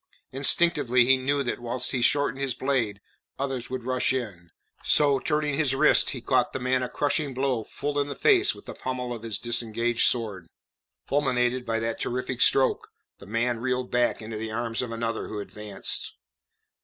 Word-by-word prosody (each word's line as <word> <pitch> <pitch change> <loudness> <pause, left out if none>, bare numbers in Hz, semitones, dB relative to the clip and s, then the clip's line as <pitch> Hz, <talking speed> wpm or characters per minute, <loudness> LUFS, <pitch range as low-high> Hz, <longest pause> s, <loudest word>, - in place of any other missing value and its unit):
Instinctively 135 -3 +4
he 135 +2 +5
knew 140 +2 0
that 120 - -3
whilst 120 +1 -1
he 125 - -1
shortened 145 +1 +1
his 135 -3 -1
blade, 120 -8 -1 0.4
others 135 -3 -4
would 130 -2 -4
rush 130 +1 0
in; 105 -10 -5 0.3
so, 140 -2 +5
turning 150 -1 0
his 135 -2 +1
wrist, - - +4
he - - -5
caught - - +1
the - - -3
man 130 0 0
a 125 - -3
crushing 145 0 -1
blow 130 -3 0
full 145 +6 -4
in 145 - 0
the 140 - -5
face 400 -2 +4
with - - -15
the - - -7
pommel 125 -1 -4
of 115 - -9
his 110 -2 -2
disengaged 120 0 0
sword. 105 -8 -2 0.6
Fulminated 125 -3 0
by 115 0 0
that 115 0 -3
terrific 125 0 -3
stroke, 135 -1 +3 0.3
the 100 - -13
man 115 +2 -1
reeled 125 +1 -2
back 120 -2 +1
into 110 0 -6
the 110 +1 -4
arms 115 +1 -2
of 125 -2 -5
another 115 0 -3
who 105 - -6
advanced. 105 0 -4
125 Hz, 180 wpm, -26 LUFS, 115-135 Hz, 0.6 s, he